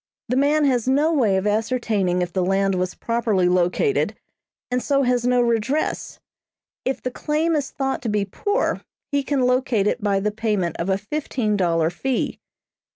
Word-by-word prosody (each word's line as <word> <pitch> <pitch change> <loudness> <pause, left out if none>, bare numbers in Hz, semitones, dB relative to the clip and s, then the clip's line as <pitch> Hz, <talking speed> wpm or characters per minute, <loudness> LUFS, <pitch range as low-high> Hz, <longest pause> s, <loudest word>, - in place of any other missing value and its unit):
The 250 - +1
man 290 +3 +3
has 255 -3 +1
no 290 +5 +3
way 220 -10 +3
of 190 - -1
ascertaining 210 -4 0
if 175 0 -6
the 185 - +1
land 195 +1 +1
was 185 0 -2
properly 225 -6 0
located, 180 - +1 0.6
and 250 0 +1
so 275 +1 +1
has 245 -1 +1
no 250 0 +3
redress. 240 +5 -1 0.6
If 265 - -2
the 255 - -2
claim 310 +5 0
is 285 -3 -1
thought 270 -1 -2
to 235 - -3
be 210 -1 0
poor, 410 - -1 0.3
he 285 0 +2
can 275 -1 -1
locate 250 -4 +2
it 210 - 0
by 200 -1 +1
the 210 +2 -1
payment 210 -6 -1
of 170 +3 -2
a 190 - +2
fifteen 215 -1 -2
dollar 165 -4 +1
fee. 260 +8 -2
230 Hz, 175 wpm, -22 LUFS, 195-270 Hz, 0.6 s, man